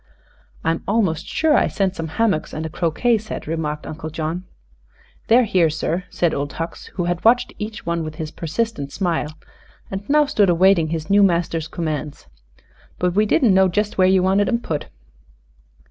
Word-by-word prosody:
"I'm 165 0 0
almost 195 -7 0
sure 315 -1 +2
I - - +3
sent 195 -1 -1
some 165 - -4
hammocks 215 -9 +1
and 155 +1 -4
a - - -3
croquet 180 +9 +1
set," 215 +1 -7
remarked 150 -1 -3
Uncle 155 0 -6
John. 160 +3 -4 0.8
"They're 240 +3 +6
here, 185 -7 +3
sir," 165 +3 -2
said 170 -2 0
Old 145 0 -3
Hucks, 165 +1 -6
who 180 - -1
had 175 0 -2
watched 240 +2 +3
each 215 +1 -6
one 170 0 -1
with 155 0 -6
his 155 0 -5
persistent 165 -3 -3
smile 165 -5 -2 0.5
and 195 0 -3
now 300 +1 +5
stood 210 -9 +2
awaiting 175 -1 +4
his 160 +3 -4
new 205 +1 +6
master's 170 -4 +1
commands. 155 - -4 0.7
"But 180 -1 0
we 210 +3 +2
didn't 220 -1 +4
know 190 0 +5
jest 205 +2 -1
where 185 - +6
ye 190 0 +4
wanted 190 +2 +2
'em 235 -1 0
put." 150 -8 -3
175 Hz, 175 wpm, -21 LUFS, 160-205 Hz, 0.8 s, They're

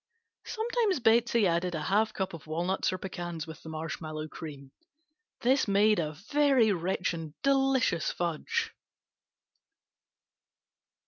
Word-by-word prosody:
Sometimes 445 - 0
Betsey 235 -1 +4
added 175 0 +1
a 155 - -3
half 215 +5 +2
cup 190 -3 -3
of 160 -2 -10
walnuts 175 +4 0
or 185 - -3
pecans 175 -4 -5
with 160 0 -10
the 160 - -9
marshmallow 155 0 -5
cream. 140 -5 -9 0.7
This 260 +1 +3
made 205 +1 +4
a 155 -2 -2 0.2
very 275 -7 +4
rich 180 0 -1
and 160 -2 -7
delicious 270 - +2
fudge. 170 -3 -2
185 Hz, 120 wpm, -29 LUFS, 160-235 Hz, 0.7 s, Betsey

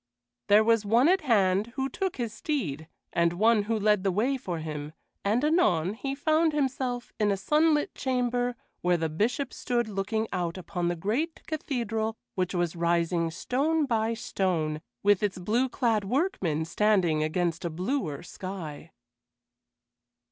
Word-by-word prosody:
There 210 +1 +6
was 230 -1 +3
one 230 +7 +4
at 375 +2 +4
hand 210 -4 +2
who 265 0 0
took 380 +6 -3
his 235 -4 -3
steed, 190 - -3 0.3
and 170 0 +2
one 215 +3 +3
who 225 +1 0
led 210 -2 +2
the 195 - +2
way 235 +9 +1
for 185 -10 -4
him, 150 -1 -5 0.3
and 220 +6 +1
anon 205 - +2
he 270 +4 -4
found 315 +2 +2
himself 260 -4 -2
in 210 -1 +3
a 200 - +1
sunlit 300 - +2
chamber 245 -1 0 0.3
where 175 0 +2
the 160 -1 -1
Bishop 240 - -1
stood 240 -2 -1
looking 215 +2 -2
out 175 0 -2
upon 175 -1 -3
the 175 - 0
great 235 - -2
cathedral 235 -7 -2 0.2
which 185 0 -1
was 175 -1 0
rising 170 0 +1
stone 285 - 0
by 230 -2 0
stone, 165 -9 -1 0.2
with 205 -1 +4
its 205 -3 0
blue 225 +8 +1
clad 230 -4 +1
workmen 195 - 0
standing 175 -3 +2
against 165 +2 -1
a 170 - -1
bluer 180 - -2
sky. 180 -5 -7
210 Hz, 155 wpm, -28 LUFS, 175-250 Hz, 0.3 s, There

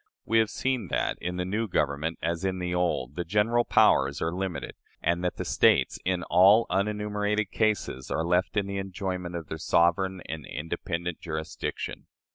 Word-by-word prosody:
We 115 +1 +3
have 110 -1 +2
seen 130 -6 -1
that, - - -1
in 90 +1 -3
the 90 - -1
new 110 +5 -1
Government 75 -1 -1
as 85 +1 -1
in 95 -1 0
the 90 -1 -2
old, 85 -7 0
the 90 - -2
general 105 +6 +2
powers 70 - +4
are 80 +1 -1
limited; 95 -1 -4 0.3
and 85 +2 0
that 90 - -1
the - - -3
States, - - +3
in 90 -1 0
all 100 +7 +6
unenumerated 105 +1 0
cases, 105 - -1
are 80 - -1
left 90 +4 +1
in 100 - +2
the 100 0 -3
enjoyment 95 -2 -4
of 85 -2 -4
their - - -6
sovereign 90 +2 +2
and 80 0 -5
independent 85 +2 -4
jurisdiction." 80 -1 -5
90 Hz, 175 wpm, -27 LUFS, 85-105 Hz, 0.3 s, all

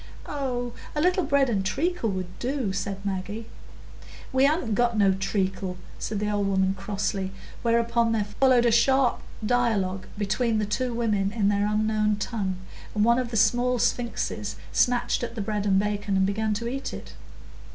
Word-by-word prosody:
"Oh, 245 -4 -3 0.2
a - - 0
little 360 +4 +3
bread 280 -2 +3
and 205 -5 0
treacle 285 - 0
would 185 -2 -5
do," 250 -6 -1
said 195 0 -4
Maggie. 200 +3 -3 0.9
"We 260 +1 +5
han't 285 -6 +1
got 235 +1 +2
no 200 -2 +5
treacle," 190 -1 -2 0.2
said 215 - -3
the 210 - -1
old 205 -1 0
woman, 190 -1 +2
crossly, 195 0 -2 0.3
whereupon 235 0 +2
there 220 -2 +1
followed 245 +4 +3
a 235 - +4
sharp 255 +2 +3 0.2
dialogue 210 -6 +1
between 215 +3 0
the 215 - +1
two 245 +5 -1
women 215 -4 0
in 210 -2 +1
their 205 0 +2
unknown 215 0 +1
tongue, 200 -3 -2 0.4
and 210 0 +3
one 235 +1 +4
of 250 -2 -2
the 230 - -2
small 245 +3 +3
sphinxes 235 +1 -1 0.2
snatched 245 -1 +2
at 235 -1 -4
the - - -5
bread 210 0 -2
and 190 -1 +4
bacon, 205 -1 0
and 190 - +3
began 210 +2 0
to 230 +3 -3
eat 270 +3 -4
it. - - -10
215 Hz, 170 wpm, -26 LUFS, 200-245 Hz, 0.9 s, We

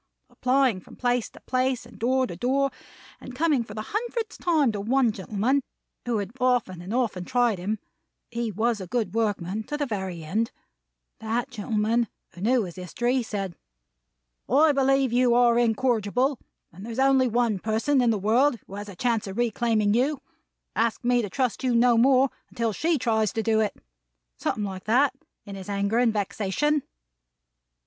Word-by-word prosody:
Applying 255 -5 +2
from - - -15
place 245 -2 0
to - - -15
place, 255 -1 0
and - - -15
door 260 +3 +2
to 175 - -7
door; 270 +8 +1 0.5
and 255 - -10
coming 295 -3 +2
for 210 -2 -11
the 215 - -4
hundredth 455 0 -3
time 310 -8 +2
to 205 -2 -4
one 245 +2 +2
gentleman, 215 +7 0 0.5
who 235 -2 +1
had 200 -1 -3
often 245 -8 +1
and 180 +3 -7
often 230 -7 0
tried 240 -1 +1
him 205 +5 -2 0.5
(he 235 -1 -2
was 220 +1 0
a 185 - -6
good 215 -2 -1
workman 210 -3 -1
to 295 - -3
the 295 - -1
very 190 - -4
end); 215 +9 -1 0.7
that 230 +4 -2
gentleman, 225 +1 0 0.3
who 175 - -11
knew 240 +3 +3
his 180 -1 -8
history, 240 +8 -1
said, 195 -6 -4 0.9
'I 295 +5 +5
believe 270 -2 +2
you 245 -1 +4
are 240 -1 +5
incorrigible; 240 +2 +1 0.3
there's 220 +7 -8
only 265 -1 +4
one 235 -3 +1
person 225 +7 +1
in 240 - +3
the 220 - +2
world 235 +7 +3
who - - -13
has 205 +1 -6
a 195 - -9
chance 230 +1 0
of 195 - -6
reclaiming 225 -3 +1
you; 265 +5 +1 0.6
ask 230 +1 0
me 245 0 +3
to 205 - -4
trust 255 +4 -1
you 250 -2 +2
no 240 0 +5
more, 260 +3 +4 0.2
until 230 -2 -1
she 325 - +1
tries 220 -4 +1
to 225 - -1
do 220 -1 +2
it.' 215 -2 0 0.6
Something 210 - -1
like 190 -2 -5
that, 255 +6 +3 0.3
in 200 - -8
his 195 0 -8
anger 200 +3 0
and 245 -2 +4
vexation." 215 +8 0
235 Hz, 175 wpm, -26 LUFS, 210-255 Hz, 0.9 s, I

